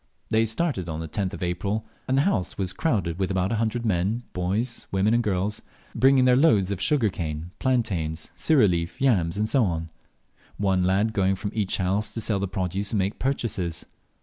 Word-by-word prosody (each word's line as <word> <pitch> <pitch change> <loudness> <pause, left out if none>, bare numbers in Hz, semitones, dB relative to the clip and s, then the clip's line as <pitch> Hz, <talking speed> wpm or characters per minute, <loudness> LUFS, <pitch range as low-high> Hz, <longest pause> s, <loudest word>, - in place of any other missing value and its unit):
They 110 +1 +3
started 110 - -1
on 80 0 -4
the 80 - -4
10th 95 +4 -2
of - - -6
April, 100 +5 -2 0.2
and 130 - +1
the 140 - +4
house 105 - 0
was 95 -2 -2
crowded 100 - -1
with 95 - 0
about 95 0 0
a 115 - 0
hundred 115 +2 -1
men, 105 +4 0
boys, 100 +7 -2
women, 100 +3 +2
and 120 - +3
girls, 105 0 -1 0.3
bringing 135 0 +4
their 125 -1 +5
loads 110 - +4
of 100 - -3
sugar 135 -8 +2
cane, 80 -2 -5
plantains, 95 -12 -1
sirih 140 -9 +4
leaf, 85 -2 -2
yams, 100 -10 +2
&c. 135 - +3 1.0
one 95 -2 +1
lad 100 +4 +2
going 95 -1 +2
from 100 +1 -4
each 105 -3 -1
house 100 +3 0
to - - -3
sell 105 -2 0
the 100 - -1
produce 95 +2 -2
and - - +2
make 100 +1 -1
purchases. 105 - -2
100 Hz, 190 wpm, -25 LUFS, 90-115 Hz, 1.0 s, their